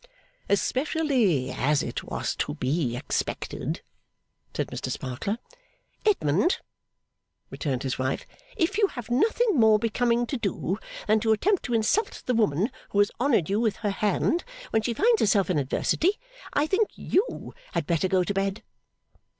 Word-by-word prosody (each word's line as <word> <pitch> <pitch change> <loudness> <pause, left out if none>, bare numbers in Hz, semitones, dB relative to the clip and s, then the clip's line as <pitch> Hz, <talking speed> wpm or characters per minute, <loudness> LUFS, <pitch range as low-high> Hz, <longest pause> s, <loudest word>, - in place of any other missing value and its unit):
'Especially 250 - +1
as 145 +2 +1
it - - -4
was - - -3
to - - -2
be 130 -2 0
expected,' - - -3 0.7
said - - -2
Mr - - -4
Sparkler. 135 - -3 0.7
'Edmund,' 320 - +3 0.9
returned 135 -4 -2
his 130 -1 -2
wife, 130 +1 -1 0.3
'if 390 +5 +1
you 410 - +5
have 245 - -8
nothing 440 - +3
more 220 -1 +6
becoming 235 +2 +1
to 270 - -3
do 195 -2 -2 0.3
than 220 0 +3
to 220 +1 +1
attempt 380 - +2
to 245 - -1
insult 310 - +1
the 250 - +1
woman 210 - +2 0.2
who - - -3
has 205 0 +4
honoured 245 - +3
you 200 +2 +1
with 225 -3 +1
her 205 -2 -2
hand, 210 - +1 0.3
when 220 - +3
she 235 +1 -2
finds 450 - +4
herself 200 -3 +3
in 160 - +2
adversity, 305 - +1 0.4
I 290 - +2
think 395 +6 +2
you 425 +7 -1 0.2
had - - 0
better 170 +1 +1
go 185 -1 +2
to 200 - -2
bed! 195 +2 -1
220 Hz, 155 wpm, -26 LUFS, 185-285 Hz, 0.9 s, more